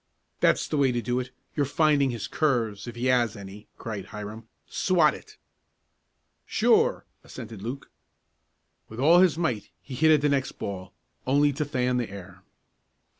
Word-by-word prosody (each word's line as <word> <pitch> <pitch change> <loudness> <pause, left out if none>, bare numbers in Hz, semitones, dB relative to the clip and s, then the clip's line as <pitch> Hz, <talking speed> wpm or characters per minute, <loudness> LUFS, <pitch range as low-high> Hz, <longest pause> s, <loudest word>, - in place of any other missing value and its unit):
"That's - - +3
the 150 - -2
way 135 -2 +3
to 120 - 0
do 125 +3 0
it. 125 0 -5 0.3
You're 145 - +2
finding 145 -2 +3
his 115 -4 -4
curves 120 -8 0
if 120 - -7
he 120 +2 -3
has 120 -3 +2
any!" 100 +1 -10
cried 105 -4 -6
Hiram. 105 +2 -8 0.2
"Swat - - +2
it!" - - -13 1.1
"Sure!" - - +2 0.2
assented 110 -3 -9
Luke. 125 +6 -6 1.0
With 110 - -9
all 165 +6 +6
his 180 -4 +4
might 125 - -2
he 135 - -11
hit 155 +5 +3
at 155 -2 +5
the 145 - +2
next 135 -1 0
ball, 95 -2 -6 0.4
only 145 +2 +3
to 150 +3 -2
fan 125 -2 0
the 120 -2 -2
air. 95 -1 -11
125 Hz, 165 wpm, -26 LUFS, 110-145 Hz, 1.1 s, all